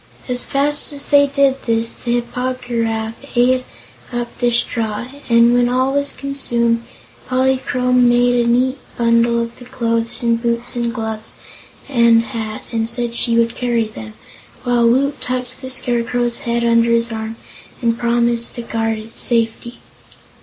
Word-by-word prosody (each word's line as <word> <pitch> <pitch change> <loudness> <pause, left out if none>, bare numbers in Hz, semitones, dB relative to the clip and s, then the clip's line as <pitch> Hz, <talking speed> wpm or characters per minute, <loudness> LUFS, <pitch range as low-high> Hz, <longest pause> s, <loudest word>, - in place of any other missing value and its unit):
As 250 -1 0
fast 290 +2 +2
as 285 0 -2
they 285 0 +5
did 275 -1 +1
this, 230 0 +1
the 240 - -3
Hip 240 0 -2
po 255 +1 -1
gy 250 -2 -4
raf 225 -1 -1 0.2
ate 255 +1 +3 0.5
up 240 -1 -4
the 245 -1 +2
straw, 230 -2 0 0.2
and 235 0 +5
when 245 0 +3
all 260 +2 +1
was 280 0 0
consumed 235 -4 0 0.5
Polychrome 255 -1 +2
made 245 0 +3
a - - -1
neat 255 +3 +1 0.2
bundle 235 0 +3
of 235 0 -5
the 245 - -11
clothes 230 -2 -1
and 230 -1 +1
boots 235 +1 -1
and 235 -1 -1
gloves 220 -2 -4 0.5
and 235 -3 +4
hat 220 -2 -5
and 225 -1 -1
said 235 0 -1
she 235 0 0
would 230 0 +2
carry 240 -2 0
them, 110 - -10 0.5
while 240 -2 +3
Woot 275 +4 +1
tucked 255 0 -4
the 260 - -6
Scarecrow's 240 -1 0
head 235 0 +1
under 230 0 +3
his 230 0 +2
arm 220 0 -5 0.4
and 230 -2 0
promised 235 0 0
to 240 - -5
guard 225 -1 -1
its 220 +1 -5
safety. 235 0 0
235 Hz, 160 wpm, -18 LUFS, 230-250 Hz, 0.5 s, they